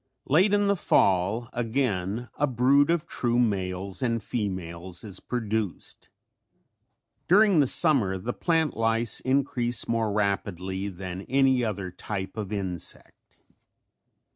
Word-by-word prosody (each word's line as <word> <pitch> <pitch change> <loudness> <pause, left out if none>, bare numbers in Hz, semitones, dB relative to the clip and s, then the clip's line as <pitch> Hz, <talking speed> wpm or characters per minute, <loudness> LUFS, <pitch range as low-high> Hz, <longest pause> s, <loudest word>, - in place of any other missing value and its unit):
Late 180 +9 +3
in 205 0 +3
the 200 0 +2
fall 100 - +2
again 115 -3 -2
a 145 - +1
brood 135 +4 +3
of 170 -1 +1
true 120 -7 0
males 95 -4 -1
and 115 -4 -1
females 90 -5 -4
is 100 -4 -4
produced. 110 -5 -4 1.2
During 200 -1 +5
the 140 - +4
summer 125 - +3
the 115 +6 -4
plant 160 -3 0
lice 115 +1 +2
increase 130 -3 0
more 115 -2 0
rapidly 100 -2 -2
than 95 0 -7
any 130 -1 +3
other 100 -4 -3
type 95 +1 -6
of 105 -3 -5
insect. 95 -5 -5
115 Hz, 120 wpm, -26 LUFS, 95-130 Hz, 1.2 s, During